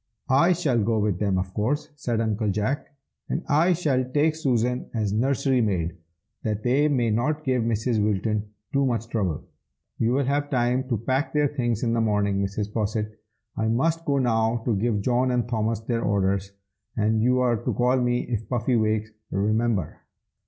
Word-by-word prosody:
"I 170 +7 +5
shall 140 -9 +1
go 115 +1 +1
with 105 -4 0
them, 100 -3 +1
of 95 0 -3
course," 145 +8 -1
said 120 -6 -1
Uncle 110 -1 0
Jack, 105 +8 -1 0.4
"and - - -2
I 165 +5 +4
shall 145 -7 +1
take 145 +5 +1
Susan 125 -5 0
as 105 -3 0
nursery 130 +2 +2
maid, 90 -6 -1 0.5
that 110 -1 -2
they 135 +5 +3
may 125 -6 +1
not 150 +8 0
give 130 -4 +1
Mrs. 115 0 0
Wilton 105 +1 0 0.2
too 140 0 +3
much 115 -3 -1
trouble. 95 -10 -1 0.6
You 115 +2 +2
will 140 +2 +2
have 145 +2 0
time 125 +1 0
to 120 - +1
pack 130 +6 -1
their 150 -1 +2
things 120 -6 -1
in 115 -1 +1
the 115 - +1
morning, 100 -2 +1
Mrs. 100 +1 -3
Posset. 110 0 -1 0.4
I 110 - 0
must 160 +9 +1
go 140 -3 +1
now 115 -2 +1
to 115 - +1
give 105 0 0
John 125 +4 +1
and 125 -1 0
Thomas 110 -2 -1
their 115 0 -2
orders, 100 -1 0 0.5
and 110 0 +2
you 125 +2 +3
are 120 -2 +2
to - - 0
call 125 +1 +2
me 125 -1 +1
if 115 -3 -4
Puffy 125 0 +1
wakes, 110 0 0 0.2
remember!" 105 -2 0
115 Hz, 180 wpm, -25 LUFS, 105-130 Hz, 0.6 s, I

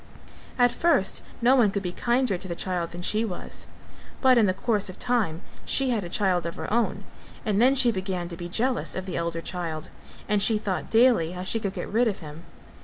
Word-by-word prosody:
At 245 -1 +4
first 245 - +2 0.2
no 255 +3 +6
one 235 -6 +5
could 195 0 -3
be 180 - -2
kinder 240 +2 +1
to 185 +2 -7
the 170 - -4
child 175 -2 -2
than 175 +1 -8
she 215 +4 +1
was, 190 -6 -5 0.5
but 260 -1 +5
in 225 -4 +4
the - - +3
course 210 -2 0
of 185 - -9
time 210 -9 0 0.2
she 270 -2 +2
had 220 -4 0
a 175 - -6
child 180 -3 +1
of 170 - -6
her - - -4
own 235 0 0 0.4
and 210 -1 +1
then 260 +3 +5
she 250 -3 +4
began 185 -3 -3
to 170 - -6
be 175 +1 -7
jealous 245 +7 0
of 185 - -4
the 185 - -5
elder 170 0 -2
child; 165 -4 -5 0.4
and 205 -1 +2
she 215 +1 +4
thought 195 -5 -3
daily 225 -8 +4
how 180 0 -5
she 225 +4 -1
could 195 -3 -3
get - - -5
rid 235 +3 +2
of 205 - -1
him. 155 +1 -10
195 Hz, 225 wpm, -26 LUFS, 175-235 Hz, 0.5 s, no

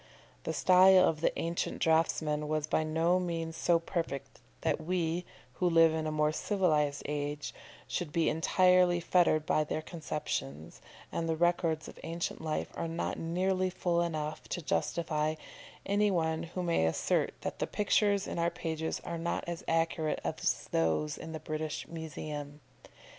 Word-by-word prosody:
The - - -1
style 185 0 +6
of 155 -1 -1
the - - +3
ancient 170 +1 -2
draughtsmen 155 -2 +1
was 155 -1 0
by 155 - +1
no 165 +3 +2
means 165 -2 -3
so 170 0 +3
perfect 165 -5 -4 0.2
that - - 0
we, 170 0 -1 0.4
who 180 - +4
live 165 -1 +6
in 160 -1 -1
a - - -1
more 150 0 +2
civilised 155 -6 +1
age, 145 0 -3 0.3
should 175 -5 -3
be 165 +1 +1
entirely 180 +2 +4
fettered 170 -3 +3
by 155 - +2
their 155 +1 -3
conceptions, 85 - -5 0.3
and 165 0 -2
the 160 - +1
records 165 -1 +1
of - - -11
ancient 170 0 -4
life 155 -1 -2
are 165 - -3
not 165 +1 -3
nearly 185 +3 0
full 175 -2 0
enough 155 -2 -3
to 175 - -3
justify 155 -1 0 0.5
any 205 +1 +2
one 160 -3 0
who 170 +2 -5
may 165 - +2
Assert 80 - 0
that - - -4
the - - 0
pictures 205 -1 +2
in - - -4
our 170 0 +2
pages 160 -1 -3
are 170 -1 -5
not 170 +1 -2
as 170 -1 -5
accurate 165 -1 +1
as - - -1
those 80 - +1
in 160 - -8
the 160 - -5
British 155 0 -4
Museum. 150 -2 -6
165 Hz, 160 wpm, -31 LUFS, 155-175 Hz, 0.5 s, style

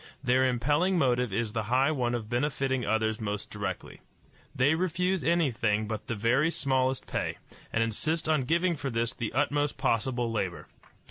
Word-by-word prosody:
Their 130 0 +3
impelling 145 +9 +1
motive 125 -6 +2
is 110 +1 -2
the 115 - 0
high 130 +4 +3
one 125 -5 0
of 115 -3 -4
benefiting 130 +1 0
others 110 0 0
most 105 -1 -3
directly. 100 -3 -5 0.5
They 135 +4 +3
refuse 180 +2 0
anything 115 -11 +1
but 110 -1 -5
the 115 - -2
very 120 +9 +2
smallest 130 -4 0
pay, - - -3 0.3
and 115 - +2
insist 155 +9 -1
on 155 -5 +2
giving 170 +4 +2
for 140 -2 -4
this 115 -1 -1
the 115 - -4
utmost 145 +2 0
possible 120 -2 0
labor. 95 -5 -3
125 Hz, 160 wpm, -28 LUFS, 115-145 Hz, 0.5 s, Their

